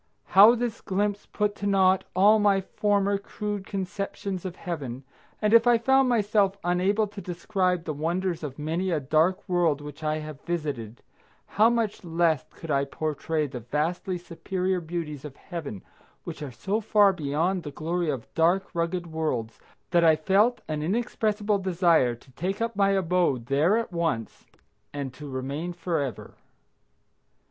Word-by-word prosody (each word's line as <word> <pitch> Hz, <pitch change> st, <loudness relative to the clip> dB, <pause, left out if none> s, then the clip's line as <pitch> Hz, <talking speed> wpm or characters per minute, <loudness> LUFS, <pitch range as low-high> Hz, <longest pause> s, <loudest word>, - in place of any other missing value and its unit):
How 210 Hz, +5 st, +7 dB
this 235 Hz, -1 st, -3 dB
glimpse 205 Hz, +1 st, -1 dB
put 210 Hz, 0 st, -1 dB
to 200 Hz, -, -3 dB
naught 190 Hz, -1 st, +3 dB
all 205 Hz, +4 st, +6 dB
my 200 Hz, -2 st, +4 dB
former 200 Hz, +1 st, 0 dB
crude 205 Hz, -1 st, -5 dB
conceptions 195 Hz, -1 st, -4 dB
of 180 Hz, -1 st, -4 dB
Heaven, 140 Hz, -9 st, -5 dB, 0.4 s
and 210 Hz, 0 st, +1 dB
if 230 Hz, +1 st, +6 dB
I 240 Hz, -1 st, +6 dB
found 265 Hz, +2 st, +3 dB
myself 205 Hz, -4 st, +2 dB
unable 185 Hz, +5 st, +2 dB
to 205 Hz, -1 st, -9 dB
describe 180 Hz, 0 st, -1 dB
the 155 Hz, -, -3 dB
wonders 170 Hz, +4 st, -1 dB
of 140 Hz, -4 st, -6 dB
many 165 Hz, +5 st, -2 dB
a 165 Hz, -4 st, +1 dB
dark 160 Hz, +8 st, +1 dB
world 175 Hz, -5 st, +2 dB
which 150 Hz, +1 st, -10 dB
I 155 Hz, 0 st, 0 dB
have 155 Hz, -2 st, -8 dB
visited, 145 Hz, -10 st, -4 dB, 0.4 s
how 220 Hz, +3 st, +4 dB
much 230 Hz, -4 st, -1 dB
less 165 Hz, -3 st, +1 dB
could 165 Hz, -, -8 dB
I 140 Hz, -1 st, +2 dB
portray 155 Hz, +2 st, -2 dB
the 130 Hz, -3 st, -6 dB
vastly 160 Hz, -, -2 dB
superior 180 Hz, +2 st, -2 dB
beauties 160 Hz, -4 st, -5 dB
of 145 Hz, -3 st, -8 dB
Heaven 155 Hz, -, -7 dB, 0.4 s
which -, -, -7 dB
are 145 Hz, -, -4 dB
so 195 Hz, -, -2 dB
far 205 Hz, -2 st, +4 dB
beyond 165 Hz, +4 st, -1 dB
the 150 Hz, -, -6 dB
glory 165 Hz, +3 st, -2 dB
of 135 Hz, -6 st, -3 dB
dark, 175 Hz, +4 st, +2 dB
rugged 170 Hz, +1 st, -1 dB
worlds 155 Hz, -9 st, -3 dB, 0.3 s
that 170 Hz, -1 st, +4 dB
I 160 Hz, -1 st, +6 dB
felt 205 Hz, +9 st, +2 dB
an 155 Hz, -1 st, -2 dB
inexpressible 210 Hz, +2 st, 0 dB
desire 170 Hz, -9 st, +3 dB
to 130 Hz, +3 st, -21 dB
take 185 Hz, +9 st, -3 dB
up 230 Hz, -1 st, -2 dB
my 200 Hz, 0 st, +3 dB
abode 180 Hz, -9 st, +1 dB
there 150 Hz, -, +3 dB
at 230 Hz, -5 st, -3 dB
once 165 Hz, -10 st, -2 dB, 0.4 s
and 140 Hz, -3 st, -5 dB
to 145 Hz, +2 st, -9 dB
remain 140 Hz, +6 st, -4 dB
forever. 160 Hz, -, -3 dB
175 Hz, 160 wpm, -26 LUFS, 155-200 Hz, 0.4 s, How